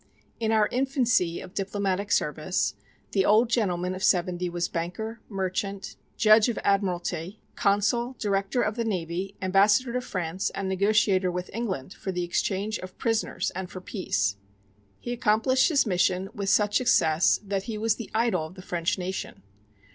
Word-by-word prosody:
In 225 -1 0
our 215 -1 +4
infancy 250 -9 +1
of 185 - -11
diplomatic 200 0 -2
service 155 +5 0 0.4
the 195 - +2
old 220 +4 +4
gentleman 185 -6 0
of 185 0 -6
seventy 180 -1 +2
was 175 0 -1
banker, 215 +7 -4
merchant, 195 0 -3 0.2
judge 215 +1 +6
of 235 - -2
admiralty, 185 -1 -1 0.2
consul, 225 +5 +1
director 200 +3 0
of 215 - -1
the 235 - 0
navy, 185 -1 -3
ambassador 205 +6 +3
to 250 - 0
France, 185 -5 -3
and 195 - -3
negotiator 190 -1 +2
with 180 0 -4
England 190 - -3
for 190 - -5
the 180 -1 -2
exchange 195 +4 -1
of 185 0 -10
prisoners 225 -1 -1
and 185 0 -5
for 185 - -7
peace. 105 - -1 0.6
He 240 - -5
accomplished 245 +3 +3
his 290 -5 +3
mission 185 -1 +1
with 200 -1 -2
such 205 0 +3
success 165 -9 +3
that 195 -1 -2
he 220 - -3
was 220 0 +1
the 230 - -7
idol 220 -8 +1
of 170 - -15
the 185 - -11
French 170 0 -1
nation. 185 +1 -5
195 Hz, 160 wpm, -26 LUFS, 180-220 Hz, 0.6 s, judge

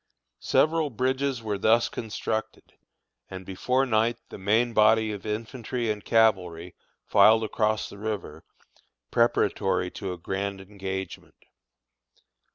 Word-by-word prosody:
Several 155 -1 +2
bridges 130 0 -1
were 105 -2 -2
thus 115 +4 +4
constructed, 110 0 -5 0.6
and 95 0 -8
before 125 +8 0
night 115 -1 +1
the - - -9
main 110 +5 +2
body 110 0 +4
of 105 0 -7
infantry 115 +2 -3
and 105 -1 -5
cavalry 90 -6 +1 0.3
filed 110 +1 +5
across 110 0 0
the 100 - -12
river, 100 -8 -5 0.7
preparatory 100 -5 +1
to 95 -3 -5
a 90 - -5
grand 95 +3 -4
engagement. 95 -1 -7
110 Hz, 115 wpm, -26 LUFS, 95-115 Hz, 0.7 s, filed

